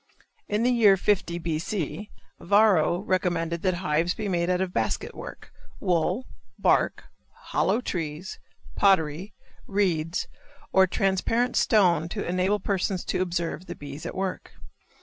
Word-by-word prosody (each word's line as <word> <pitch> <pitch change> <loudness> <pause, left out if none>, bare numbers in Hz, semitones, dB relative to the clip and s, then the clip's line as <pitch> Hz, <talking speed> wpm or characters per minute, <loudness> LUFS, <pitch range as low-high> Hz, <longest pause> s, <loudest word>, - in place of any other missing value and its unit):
In 210 +2 0
the 250 - +3
year 215 -5 +5
50 180 -3 0
B. 165 -2 -2
C., 200 +2 -4 0.3
Varro 190 -4 +3
recommended 175 -4 -1
that 185 -1 +1
hives 170 0 0
be 215 - -4
made 175 -2 0
out 180 0 +1
of 185 -1 -2
basket 110 -5 -1
work, - - -10 0.3
wool, 180 +7 0 0.3
bark, - - +2 0.5
hollow 240 - +2
trees, 165 -4 -4 0.4
pottery, 185 0 +2 0.3
reeds, 175 -5 0 0.5
or 190 0 +6
transparent 195 +7 0
stone 175 -7 +3
to 205 +3 -4
enable 185 +4 +1
persons 190 -1 -1
to - - -1
observe 175 0 -2
the - - -6
bees 145 +1 -8
at - - -6
work. 190 -1 -4
185 Hz, 135 wpm, -26 LUFS, 170-200 Hz, 0.5 s, or